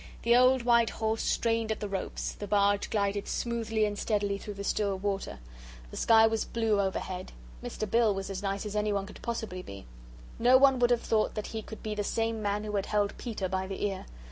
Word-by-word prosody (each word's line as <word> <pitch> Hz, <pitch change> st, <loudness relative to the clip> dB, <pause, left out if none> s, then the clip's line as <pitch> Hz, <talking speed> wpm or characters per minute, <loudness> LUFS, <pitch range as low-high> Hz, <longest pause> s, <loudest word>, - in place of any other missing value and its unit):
The 235 Hz, +1 st, +5 dB
old 255 Hz, 0 st, +5 dB
white 235 Hz, -1 st, +4 dB
horse 220 Hz, 0 st, -1 dB
strained 225 Hz, -1 st, 0 dB
at 220 Hz, -, -2 dB
the 210 Hz, -, -3 dB
ropes, 195 Hz, -1 st, -3 dB
the 205 Hz, -, -7 dB
barge 200 Hz, 0 st, +2 dB
glided 200 Hz, -1 st, -1 dB
smoothly 225 Hz, -2 st, -1 dB
and 205 Hz, -1 st, -3 dB
steadily 205 Hz, -2 st, 0 dB
through 205 Hz, 0 st, -7 dB
the 200 Hz, -, -6 dB
still 200 Hz, -1 st, 0 dB
water. 195 Hz, 0 st, -3 dB, 0.5 s
The -, -, -9 dB
sky 225 Hz, -1 st, +6 dB
was 225 Hz, 0 st, +1 dB
blue 225 Hz, -3 st, +1 dB
overhead. 190 Hz, -1 st, -3 dB, 0.3 s
Mr. 215 Hz, -, -4 dB
Bill 230 Hz, +1 st, +3 dB
was 195 Hz, 0 st, -4 dB
as 190 Hz, 0 st, -4 dB
nice 200 Hz, 0 st, -2 dB
as 210 Hz, 0 st, -5 dB
anyone 210 Hz, -2 st, 0 dB
could 210 Hz, -, -12 dB
possibly 220 Hz, -6 st, -4 dB
be. 100 Hz, -, -10 dB, 0.5 s
No 250 Hz, +2 st, +6 dB
one 270 Hz, -1 st, +5 dB
would 240 Hz, -1 st, +4 dB
have 240 Hz, -1 st, +2 dB
thought 215 Hz, -1 st, +1 dB
that 215 Hz, -, -3 dB
he 220 Hz, -, -3 dB
could 220 Hz, -, -10 dB
be 215 Hz, -, -2 dB
the 210 Hz, 0 st, -2 dB
same 225 Hz, +1 st, -1 dB
man 205 Hz, 0 st, -1 dB
who 210 Hz, -1 st, -2 dB
had 195 Hz, -, -2 dB
held 205 Hz, -1 st, 0 dB
Peter 215 Hz, -6 st, -3 dB
by 190 Hz, 0 st, -2 dB
the 195 Hz, +1 st, -3 dB
ear. 195 Hz, -2 st, -4 dB
210 Hz, 220 wpm, -29 LUFS, 200-225 Hz, 0.5 s, sky